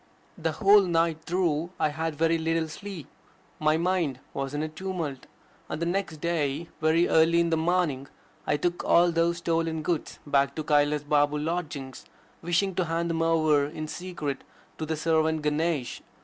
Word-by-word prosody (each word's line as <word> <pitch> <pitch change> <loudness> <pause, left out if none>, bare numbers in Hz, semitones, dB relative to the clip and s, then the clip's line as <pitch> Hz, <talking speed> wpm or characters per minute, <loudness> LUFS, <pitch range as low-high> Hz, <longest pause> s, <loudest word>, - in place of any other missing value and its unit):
The 165 -4 -2
whole 200 +4 +6
night 165 -3 0
through 170 -2 0
I 155 - +2
had 160 +1 -3
very 165 +2 +2
little 165 0 0
sleep. 175 0 -8 0.5
My 155 0 +3
mind 170 -6 0
was 135 +1 -3
in 150 - -1
a - - -1
tumult. 160 -5 -5 0.4
On - - -3
the 170 - -2
next 180 -2 -2
day, 165 -1 -1
very 160 +2 +3
early 165 +1 +4
in 170 0 +1
the - - +4
morning, 160 -5 0 0.4
I - - +2
took 175 +3 -1
all 175 0 +4
those 170 +1 +1
stolen 165 -1 -1
goods 165 0 -2
back 140 -1 +2
to 155 - -3
Kailas 150 0 +2
Babe's 145 0 +2
lodgings, 155 -5 -4 0.4
wishing 185 +3 +1
to 180 0 0
hand 165 +1 -1
them 165 0 -1
over 155 -3 +3
in 155 +1 -6
secret 155 -5 -5 0.4
to 155 - -3
the 160 0 -2
servant 160 -1 +1
Ganesh. 150 -3 -1
160 Hz, 170 wpm, -27 LUFS, 150-170 Hz, 0.5 s, whole